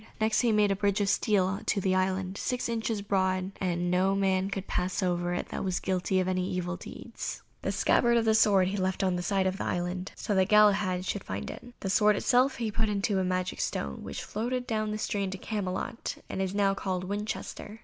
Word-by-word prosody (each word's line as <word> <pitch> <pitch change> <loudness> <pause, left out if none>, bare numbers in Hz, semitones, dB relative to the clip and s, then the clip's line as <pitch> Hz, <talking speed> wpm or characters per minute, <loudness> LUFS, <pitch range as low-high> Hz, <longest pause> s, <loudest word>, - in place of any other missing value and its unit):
Next 220 0 +2
he 240 -2 +3
made 210 -2 +3
a - - +2
bridge 200 +1 +1
of 200 -1 +1
steel 195 -2 +2
to 205 - +2
the 190 -1 +1
island, 185 0 0
six 250 +4 -2
inches 225 -2 -2
broad, 190 -1 0
and 175 -1 0
no 190 +2 +3
man 190 -1 +1
could 195 -1 -4
pass 180 +2 -1
over 175 -1 0
it - - -4
that - - -4
was 185 -2 0
guilty 185 0 0
of 185 - 0
any 185 0 0
evil 180 -1 -2
deeds. - - -7 0.2
The - - -1
scabbard 235 0 +3
of 230 - +2
the 220 - +4
sword 200 -4 +4
he 200 - -2
left 190 0 0
on 185 -1 +2
this 175 0 -3
side 195 -2 +1
of 190 +1 -1
the - - -1
island, 180 +2 -2
so 210 - -2
that 190 0 +3
Galahad 200 -3 +4
should 200 0 -2
find 95 +2 -4
it. 245 0 -12
The 195 - -2
sword 210 +1 +4
itself 255 +5 +3
he 225 -2 -2
put 220 +1 0
in 200 -1 -1
a 190 - +2
magic 185 0 -1
stone, 70 -1 -3
which - - -5
floated 245 +4 -2
down 215 -3 -1
the 210 - -2
stream 200 -2 -1
to 190 - -5
Camelot, 200 +2 -3
that - - -5
is 190 0 -1
now 200 -1 +3
called 185 -2 -2
Winchester. 210 +2 -5
195 Hz, 225 wpm, -29 LUFS, 185-210 Hz, 0.2 s, the